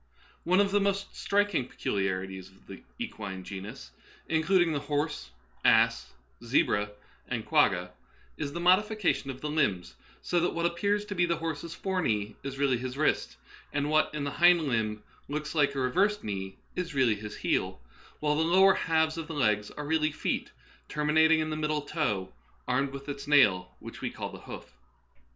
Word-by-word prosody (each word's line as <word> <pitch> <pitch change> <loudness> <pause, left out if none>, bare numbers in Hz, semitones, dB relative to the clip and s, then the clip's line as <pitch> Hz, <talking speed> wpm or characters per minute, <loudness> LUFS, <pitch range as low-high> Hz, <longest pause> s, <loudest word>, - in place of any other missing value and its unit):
One 185 +3 +4
of 200 -1 +3
the 205 0 +3
most 200 0 -1
striking 200 -10 +1
peculiarities 95 -3 -3
of 95 0 -23
the - - -10 0.2
equine 95 -3 -6
genus 100 +7 -8 0.2
— - - -26
including 175 +1 +3
the 145 - 0
horse, 145 - -2 0.3
ass, - - +3 0.3
zebra, 105 0 +1 0.3
and - - -3
quagga - - +2 0.2
— - - -31
is 140 - -4
the 170 - -5
modification 190 -3 +2
of 130 -1 -6
the 150 - -3
limbs, 100 - 0 0.3
so 175 - +1
that 175 - 0
what 170 0 0
appears 200 +5 0
to 210 - -5
be 175 -2 +2
the 170 - +1
horse's 165 0 -4
fore 190 -1 -1
knee 105 -6 -1
is 135 0 -6
really 135 -3 +2
his 130 +1 -5
wrist, 155 - 0 0.4
and 145 0 0
what 155 0 +4
in 150 - -2
the 140 - -2
hind 175 +1 +5
limb 110 -6 -1 0.2
looks 150 +1 -4
like 145 -3 +2
a - - -1
reversed 195 +12 +1
knee 95 -2 -5 0.2
is 175 -5 -4
really 130 -4 +4
his 105 0 -7
heel, - - -1 0.4
while 150 0 +2
the 155 - +1
lower 190 +4 +6
halves 160 -1 +1
of 160 - -6
the 160 - -6
legs 105 -6 +1
are 150 - -7
really 155 0 +1
feet - - -2 0.4
terminat 150 +1 +3
ing 160 0 +5
in 155 0 -2
the - - -1
middle 150 -1 -1
toe 105 - -2 0.3
armed 130 +2 +1
with 140 +1 -8
its 140 -1 -6
nail, 105 -11 +4
which - - -10
we - - -1
call - - -6
the - - -10
hoof. - - -10
150 Hz, 185 wpm, -29 LUFS, 115-170 Hz, 0.4 s, lower